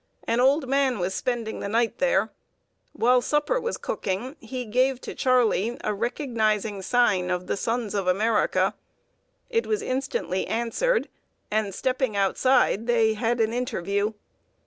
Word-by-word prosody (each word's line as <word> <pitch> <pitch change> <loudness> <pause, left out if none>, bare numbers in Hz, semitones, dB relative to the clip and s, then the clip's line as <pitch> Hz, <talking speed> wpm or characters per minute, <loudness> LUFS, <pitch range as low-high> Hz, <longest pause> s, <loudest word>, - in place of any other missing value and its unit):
An 230 - 0
old 270 +2 +3
man 270 -2 +2
was 180 0 -2
spending 235 0 -2
the 200 - -4
night 230 +2 0
there. - - +2 0.6
While 250 +2 +3
supper 295 - 0
was 470 +1 -2
cooking, 210 +9 -3
he 250 +2 -6
gave 255 +4 +1
to - - -6
Charley 240 -3 +2
a 210 - 0
recognizing 220 -3 -1
sign 195 -5 +2
of 180 0 -1
the - - -1
Sons 230 +1 -2
of 200 -3 -1
America. 210 +4 +2 0.8
It 460 0 +1
was 430 0 -1
instantly 255 -8 -2
answered; 345 - 0 0.4
and, 215 -1 0
stepping 255 +2 -1
outside, 225 +2 +2
they 225 -2 +3
had 230 +2 -1
an 225 0 +1
interview. 210 -4 -1
235 Hz, 145 wpm, -25 LUFS, 210-260 Hz, 0.8 s, old